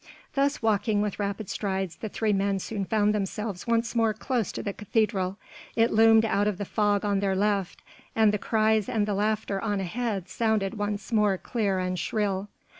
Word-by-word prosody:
Thus 280 -2 +1
walking 210 -1 +2
with 210 -1 -3
rapid 200 0 -3
strides 190 -4 -3
the 220 - -5
three 215 0 0
men 195 0 +1
soon 200 +1 -3
found 210 0 +2
themselves 210 0 -3
once 230 0 +1
more 225 -2 +2
close 235 -2 -1
to - - -5
the 200 - -3
cathedral: 200 -3 0 0.4
it 230 0 +3
loomed 225 0 +6
out 205 -1 +1
of 210 -3 -1
the 205 - -3
fog 205 0 +1
on 200 -1 +1
their 195 -1 0
left 200 -2 0 0.3
and 220 -2 +4
the 210 - 0
cries 220 -1 +2
and 215 -2 +1
the 205 - -1
laughter 205 -1 -1
on 205 -3 -1
ahead 195 0 -2
sounded 220 -2 0
once 205 0 -3
more 210 -4 +3
clear 205 -3 -1
and 185 -1 -2
shrill. 200 +1 -1
210 Hz, 190 wpm, -27 LUFS, 195-220 Hz, 0.4 s, loomed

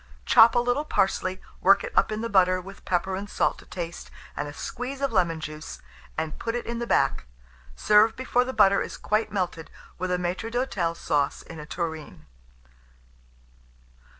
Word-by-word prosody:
Chop 225 +1 +7
a - - +5
little 245 +4 +1
parsley, 190 -7 0 0.2
work 195 +1 +5
it - - -7
up - - +3
in 215 0 -3
the 230 - -2
butter, 185 -2 +4
with 195 +2 -11
pepper 185 +1 0
and 200 +2 -6
salt - - 0
to - - -16
taste, 170 -1 -6 0.3
and 145 - -3
a - - -6
squeeze 250 - -5
of 275 -2 0
lemon 170 -6 +1
juice, 155 0 -7 0.4
and 160 -1 -3
put 230 0 -3
it 240 - -3
in 235 0 -4
the 235 - -3
back. - - +1 0.5
Serve 210 - +4
before 255 -1 +1
the 255 - -4
butter 200 -4 +4
is - - -5
quite 215 +1 0
melted, 180 -5 -3 0.3
with 185 +1 -2
a 180 - +2
maître 180 +5 -3
d'hôtel 200 -9 -1
sauce 145 -4 0
in 165 - -10
a 150 - -9
tureen. 160 - -5
190 Hz, 180 wpm, -26 LUFS, 170-230 Hz, 0.5 s, Chop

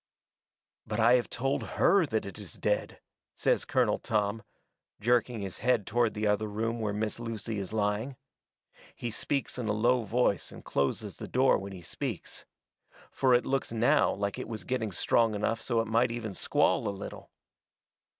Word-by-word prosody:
"'But 105 +1 -2
I 115 +2 +6
have 125 -1 +2
told 135 +3 -1 0.2
HER 195 -5 +5
that 110 -3 -1
it 100 +2 -8
is 100 -6 -6
dead,'" 105 0 -1 0.4
says - - +1
Colonel - - +2
Tom, 105 0 0 0.6
jerking 120 0 +1
his 95 -2 -5
head 120 -3 +2
toward 120 -2 +1
the 105 +1 -1
other 105 +1 +1
room 115 +3 -2
where 105 -2 -1
Miss 105 +2 -2
Lucy 115 -2 -4
is 95 -2 -5
lying. 110 +4 -1 0.8
He 120 - -4
speaks 135 +3 -2
in 120 - -2
a 105 - +1
low 120 +4 +3
voice 110 -2 +1
and - - -12
closes 70 -1 -1
the - - -7
door 130 +1 +3
when 100 +1 -7
he 90 -2 -9
speaks. - - -5 0.7
Fur 130 -2 +3
it 120 - +2
looks 135 -3 -1
now 120 +6 +3
like 100 0 -2
it - - -5
was 110 -2 -5
getting 120 -5 -2
strong 110 +4 +2
enough 110 +2 -1
so 115 -2 +1
it 115 - -4
might 115 +3 +3
even 115 -3 -4
squall - - +2
a - - +1
little. 100 0 -7
110 Hz, 180 wpm, -30 LUFS, 105-120 Hz, 0.8 s, I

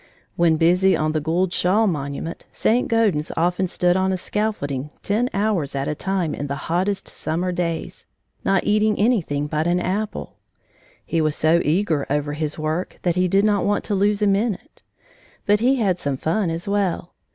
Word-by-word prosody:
When 170 -2 +3
busy 180 +4 +4
on 155 0 0
the 155 0 -1
Gould 170 +4 0
Shaw 200 +5 +2
monument, 150 -2 -3
St. 240 +3 +1
Gaudens 210 -10 +1
often 180 +3 +1
stood 175 0 +2
on 190 0 +1
a 185 - 0
scaffolding 150 -10 -2
ten 225 +5 +1
hours 195 -9 0
at 135 0 -2
a - - 0
time 180 -1 -2
in 145 - -4
the 140 - -3 0.2
hottest 190 +3 0
summer 175 +4 -2
days, 170 -2 -3 0.4
not 195 -1 +2
eating 215 0 +2
anything 190 - +1
but 155 +2 -1
an 175 +1 +2
apple. 200 +4 -3 0.7
He 165 - 0
was 155 -1 +1
so 165 +2 +3
eager 160 -2 +1
over 145 0 0
his 150 0 -3
work 155 +3 -3
that 175 -2 +1
he 180 0 +2
did 195 +3 +3
not 205 -2 +2
want 205 0 +1
to 210 - -3
lose 205 +1 +2
a - - +4
minute. 200 +1 -1 0.6
But 205 0 +3
he 255 +4 +3
had 195 -8 +1
some 140 -2 -2
fun 170 +6 0
as 165 +4 -4
well. 200 -3 -1
180 Hz, 185 wpm, -22 LUFS, 155-205 Hz, 0.7 s, busy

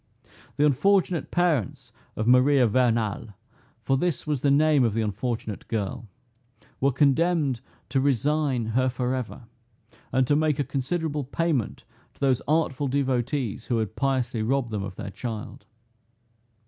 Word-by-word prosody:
The 150 - +4
unfortunate 175 +4 +2
parents 165 - 0 0.2
of 110 - -2
Maria 125 +1 +5
Vernal 115 -3 0 0.5
(for 135 - +1
this 175 -2 -1
was 150 -4 -1
the 140 - +2
name 145 -1 +4
of 115 -3 +1
the 115 - +1
unfortunate 110 0 -4
girl) 115 +2 -3 0.7
were 140 +1 +3
condemned 140 -1 +2 0.3
to 135 - +1
resign 140 -1 +1
her 130 +2 +2
forever, 125 -1 -3 0.7
and 130 0 +2
to 145 - +2
make 155 -1 +1
a 145 - +1
considerable 150 +3 -2
payment 145 -3 -1 0.3
to - - -27
those 135 -3 +2
artful 145 -3 +1
devotees 130 -3 -1
who 120 - +1
had 110 -1 -2
piously 125 -2 0
robbed 120 +1 0
them 105 -2 -2
of 95 -1 -6
their 100 - -6
child. 115 +2 -7
130 Hz, 140 wpm, -25 LUFS, 120-145 Hz, 0.7 s, Maria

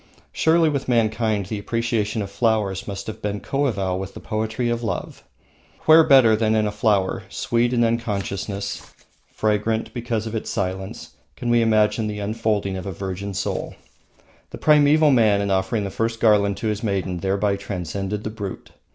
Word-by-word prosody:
Surely 165 0 +3
with 140 -3 -1
mankind 110 -3 +1
the 105 +3 -4
appreciation 115 -1 -1
of 100 - -8
flowers 105 -3 0
must 100 -1 -5
have 110 - -7
been 105 0 -2
coeval 100 -11 -1
with 95 0 -7
the - - -7
poetry 110 +2 -2
of 120 0 -1
love. 115 - -4 0.6
Where 160 +1 +7
better 135 -7 +6
than 110 0 +1
in 110 -1 +2
a 105 - -1
flower, 105 -2 +1
sweet 120 +1 0
in 120 -1 +2
its - - +4
unconsciousness, 100 -3 -3 0.4
fragrant 110 +1 -1
because 120 -3 -2
of 110 - -5
its 110 - -3
silence, 95 0 -4 0.2
can 120 - -2
we 120 0 +4
image 110 -2 +3
the 105 -2 -2
unfolding 105 -2 -1
of 95 - -6
a - - -3
virgin 95 +2 -5
soul? 100 - -3 0.7
The - - -8
primeval 150 0 +5
man 110 -5 +4
in 100 -1 -1
offering 95 +3 0
the 100 - -4
first 115 +2 -2
garland 105 -3 +3
to 110 - -3
his 105 0 -2
maiden 95 -4 -2
thereby 100 +2 0
transcended 100 +1 -4
the 110 - -4
brute. 105 -3 -7
105 Hz, 175 wpm, -22 LUFS, 100-115 Hz, 0.7 s, Where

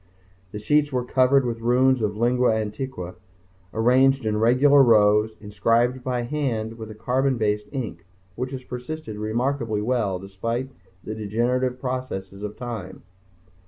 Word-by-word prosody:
The - - -6
sheets 145 +7 +2
were 125 -2 -1
covered 130 +1 +3
with 115 -1 -3
runes 125 +2 +3
of 105 -1 -1
lingua 120 0 +2
antiqua 110 -3 -4 0.6
arranged 130 +3 +3
in 105 -1 0
regular 135 +5 +5
rows, 110 -2 +4
inscribed 115 +5 +1
by 125 -1 -1
hand 120 -5 -2
with 110 -1 -7
a 110 - -9
carbon 130 +4 0
based 105 -1 0
ink 115 - -5 0.3
which 125 +6 -4
has 130 -1 -7
persisted 125 -2 -6
remarkably 115 +1 -1
well 105 -4 0
despite 115 +7 -4 0.3
the 110 - -5
degenerative 120 +4 -1
processes 125 -7 -4
of 105 0 -6
time. 110 -7 -7
120 Hz, 140 wpm, -24 LUFS, 105-130 Hz, 0.6 s, regular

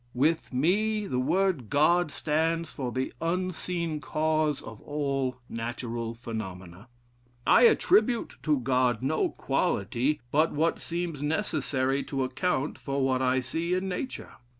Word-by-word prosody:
With 155 +6 +1
me, 205 +10 +1
the 125 -9 -1
word 170 - +1
God 155 +2 +3
stands 165 +3 0
for 130 -4 -4
the 130 +1 -2
unseen 170 -2 -2
cause 155 -2 +1
of 110 -2 -10
all 140 -3 -2
natural 115 0 -4
phenomena. 95 -4 -7 0.6
I 475 - +7
attribute 360 - +2
to 150 -3 +2
God 125 -2 +1
no 150 +4 +1
quality 125 +9 0
but 155 +3 +3
what 160 +3 +1
seems 170 -4 -3
necessary 145 -5 0
to 135 -2 -1
account 130 +2 -1
for 140 -1 -1
what 130 -1 +1
I 130 0 +2
see 165 +8 -1
in 185 +1 -1
nature. 255 +8 -5
145 Hz, 130 wpm, -28 LUFS, 130-170 Hz, 0.6 s, I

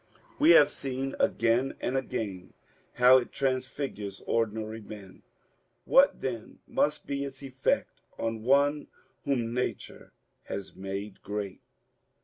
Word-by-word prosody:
We 300 +3 +5
have 145 0 +6
seen 135 0 -3
again 115 +4 +2
and 125 - -2
again 105 -8 -3 0.4
bow 125 +1 +8
it 120 - -7
transfigures 130 -6 -3
ordinary 110 0 -1
men. 100 -3 -11 0.6
What 275 +1 +5
then 120 -4 -5
must 150 - 0
be 140 0 -2
its 135 0 -7
effect 130 -1 -1 0.2
on 115 -1 -2
one 140 +4 +3 0.4
whom 120 -5 0
Nature 125 +1 -4 0.3
has 100 -1 -6
made 95 +1 -6
great. 100 -2 -5
125 Hz, 120 wpm, -29 LUFS, 105-135 Hz, 0.6 s, bow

